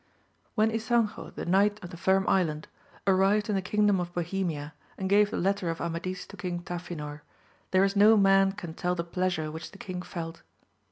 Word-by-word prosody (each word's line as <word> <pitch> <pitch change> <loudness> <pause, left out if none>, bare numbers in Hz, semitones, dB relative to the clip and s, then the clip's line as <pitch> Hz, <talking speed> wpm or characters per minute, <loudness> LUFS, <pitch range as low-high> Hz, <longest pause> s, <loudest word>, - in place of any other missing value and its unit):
HEN 220 +1 +4
Ysanjo 225 -1 0
the - - -5
Knight 200 +4 +3
of 175 - -8
the - - -8
Firm 190 +2 +2
Island 155 -5 +1 0.4
arrived 195 +2 +3
in 210 - +1
the 195 - +1
kingdom 205 +1 +2
of 175 -1 -3
Bohemia 170 -4 -2 0.2
and 190 - -2
gave 205 +1 +4
the - - -3
letter 195 -1 0
of 165 - -3
Amadis 175 +2 -3
to - - -13
King 175 -1 -4
Tafinor, 165 -4 -6 0.5
there 185 0 +4
is 195 +1 +1
no 215 +2 +7
man 195 -1 +5
can 175 -5 -7
tell 180 +2 -1
the 170 - -2
pleasure 170 -3 -1
which 160 +1 -7
the 200 - -14
king 185 -2 -5
felt. 165 -2 -6
185 Hz, 190 wpm, -28 LUFS, 170-200 Hz, 0.5 s, no